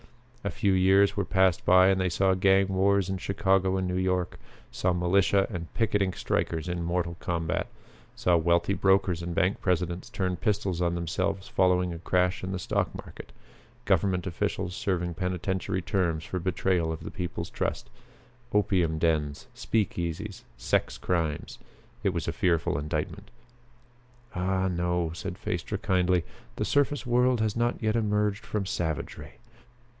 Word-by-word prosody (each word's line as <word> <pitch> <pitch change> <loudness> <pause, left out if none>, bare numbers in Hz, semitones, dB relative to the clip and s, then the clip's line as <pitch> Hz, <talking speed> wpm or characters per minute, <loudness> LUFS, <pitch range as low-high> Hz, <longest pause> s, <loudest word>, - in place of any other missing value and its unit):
A 100 - -1
few 95 +2 +1
years 95 +2 +4
were 100 - 0
passed 95 -2 +2
by 95 +1 +6
and 95 -1 +2
they 90 - +1
saw 95 +2 +2
gang 95 +1 +4
wars 95 0 +2
in 95 -1 -3
Chicago 95 0 +1
and 95 -1 -1
New 90 - -2
York; 90 -1 -1 0.3
saw 90 - 0
militia 95 +2 +3
and 85 -4 -6
picketing 105 -4 +1
strikers 80 -1 -1
in 90 -1 -2
mortal 85 0 -1
combat; 85 -2 -2 0.5
saw 90 - +2
wealthy 85 +3 +2
brokers 95 -3 +2
and 85 0 -4
bank 95 +1 +1
presidents 90 -1 -1
turn 90 -2 -2
pistols 100 -3 -1
on 85 -1 +1
themselves 95 +3 -2
following 90 -1 +2
a 85 - -7
crash 90 +1 +1
in 95 - -3
the 95 - -2
stock 90 - -1
market; - - -10 0.5
government 95 -2 +2
officials 95 0 -2
serving 90 -3 -1
penitentiary 90 +1 -2
terms 85 -6 0
for 90 - -4
betrayal 90 -2 0
of 80 - -5
the - - -6
people's 90 -2 -5
trust; - - -2 0.6
opium 90 -6 +2
dens, 75 -3 0
speakeasies, 95 -2 -2 0.2
sex - - 0
crimes. 80 -5 -2 0.4
It 105 - +2
was 85 -3 -3
a 85 - -1
fearful 85 -8 +1
indictment. 75 +1 -4 1.0
"Ah, 95 +1 0
no," 90 -2 0
said 90 0 -6
Phaestra - - -3
kindly, 90 -2 +2 0.3
"the - - -1
surface 145 -1 +1
world 125 0 +3
has 110 -1 0
not 120 +1 +1
yet 110 0 +1
emerged 105 -2 0
from 105 -2 -2
savagery. 80 -5 -4
90 Hz, 150 wpm, -28 LUFS, 85-95 Hz, 1.0 s, by